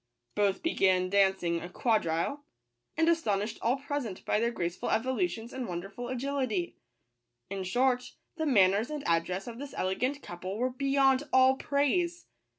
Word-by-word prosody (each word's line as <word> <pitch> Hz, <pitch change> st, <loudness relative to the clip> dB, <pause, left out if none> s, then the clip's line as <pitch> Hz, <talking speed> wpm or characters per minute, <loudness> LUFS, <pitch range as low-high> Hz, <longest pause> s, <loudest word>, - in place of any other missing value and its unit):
Both 200 Hz, -2 st, +1 dB
began 185 Hz, -, +2 dB
dancing 190 Hz, -4 st, +2 dB
a 175 Hz, -, -7 dB
quad 220 Hz, +2 st, +1 dB
rille, 165 Hz, -, -1 dB, 0.6 s
and 325 Hz, 0 st, +3 dB
astonished 220 Hz, -10 st, +1 dB
all 240 Hz, +3 st, +2 dB
present 275 Hz, -8 st, -4 dB
by 210 Hz, -, +2 dB
their 235 Hz, +1 st, +2 dB
grace 175 Hz, -6 st, -3 dB
ful -, -, -4 dB
evolutions 255 Hz, +1 st, -1 dB
and 260 Hz, -2 st, -4 dB
wonderful 195 Hz, +7 st, -5 dB
agility. 255 Hz, -8 st, -2 dB, 0.8 s
In 195 Hz, -1 st, -3 dB
short, 250 Hz, +5 st, +1 dB, 0.2 s
the 315 Hz, -1 st, -2 dB
manners 205 Hz, -1 st, +4 dB
and 300 Hz, -2 st, -4 dB
address 170 Hz, +3 st, 0 dB
of 235 Hz, 0 st, -8 dB
this 285 Hz, 0 st, -7 dB
elegant 250 Hz, +10 st, -1 dB
couple 185 Hz, +3 st, -6 dB
were 255 Hz, +2 st, 0 dB
beyond 270 Hz, +1 st, +2 dB
all 260 Hz, 0 st, +6 dB
praise. 335 Hz, +6 st, 0 dB
235 Hz, 155 wpm, -30 LUFS, 190-275 Hz, 0.8 s, all